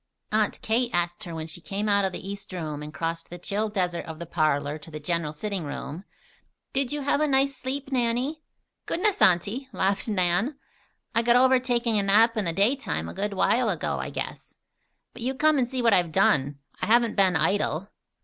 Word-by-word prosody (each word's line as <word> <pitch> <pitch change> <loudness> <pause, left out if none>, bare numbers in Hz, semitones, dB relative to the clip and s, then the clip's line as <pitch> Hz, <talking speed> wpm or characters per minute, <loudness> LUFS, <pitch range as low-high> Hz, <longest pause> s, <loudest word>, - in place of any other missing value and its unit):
Aunt 215 -1 +1
Kate 235 +2 +1
asked 175 +4 -1
her 170 -2 -6
when 160 -1 -4
she 160 +2 -8
came 200 +4 -3
out 200 -1 +3
of 190 - 0
the 185 - -7
east 200 0 -7
room 155 -4 -4
and 150 0 -7
crossed 165 +1 -4
the 175 - -7
chill 205 +5 -2
desert 180 -4 -1
of 160 -1 -7
the 170 - -6
parlor 155 -2 0
to 150 - -13
the 155 -1 -7
general 165 0 -2
sitting 195 +3 -3
room: 150 +4 -6 0.7
"Did 270 -2 0
you 295 0 -2
have 285 +1 +1
a 305 - +3
nice 275 0 +2
sleep, 270 +2 -5
Nannie?" 255 +5 0 0.5
"Goodness, 380 - 0
Auntie!" 215 +7 +3
laughed 195 +3 0
Nan. 205 - +1 0.6
"I 230 - +3
got 235 +1 +4
over 260 +1 +5
taking 240 -3 +1
a - - +2
nap 220 +4 +4
in 215 -3 -1
the 170 - 0
daytime 200 - +1
a - - -7
good 205 +1 -2
while 190 - +2
ago, - - -2
I - - -4
guess. - - -6 0.6
But - - -10
you 260 +3 -1
come 305 +2 +3
and 245 -2 0
see 255 -1 -2
what 230 -3 +5
I - - +7
have 175 -2 +1
done. 140 -2 +2 0.2
I - - -1
haven't 235 0 +4
been 190 -3 +4
idle." 195 0 +1
200 Hz, 210 wpm, -26 LUFS, 170-245 Hz, 0.7 s, I